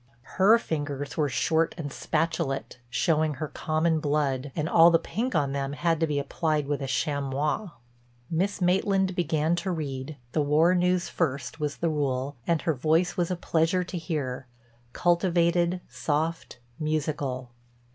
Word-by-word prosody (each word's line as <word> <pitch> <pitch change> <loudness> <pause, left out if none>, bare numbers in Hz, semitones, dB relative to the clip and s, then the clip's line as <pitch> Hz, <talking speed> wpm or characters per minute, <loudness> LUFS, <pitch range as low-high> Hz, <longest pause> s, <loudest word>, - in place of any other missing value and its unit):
Her 215 +4 +7
fingers 145 -7 -4
were 150 -2 +1
short 160 +5 +1
and 145 -4 -5
spatulate, 140 -4 -2
showing 155 +3 +1
her 155 +4 -4
common 160 +1 0
blood, 145 -2 0
and 155 -1 -1
all 165 0 +7
the 165 - +5
pink 230 +10 -3
on 140 -2 +1
them 140 0 -2
had 165 +1 0
to 165 - +2
be 150 -1 -1
applied 150 +1 0
with 145 0 -2
a 135 - -3
chamois. 145 +7 -1 0.6
Miss 185 +6 -1
Maitland 190 +1 +2
began 160 -1 +1
to 175 +3 -2
read—the 140 -4 -3
war 155 +5 +4
news 180 0 +2
first 140 -2 -2
was 150 -1 -2
the 170 - 0
rule—and 140 +1 -1
her 160 - +2
voice 160 +6 +1
was 175 -3 0
a 180 - 0
pleasure 170 +1 +1
to 180 0 -6
hear, 140 -6 -3 0.4
cultivated, 175 +1 +2
soft, 160 -1 -2 0.2
musical. 145 -5 -2
155 Hz, 145 wpm, -27 LUFS, 140-170 Hz, 0.6 s, Her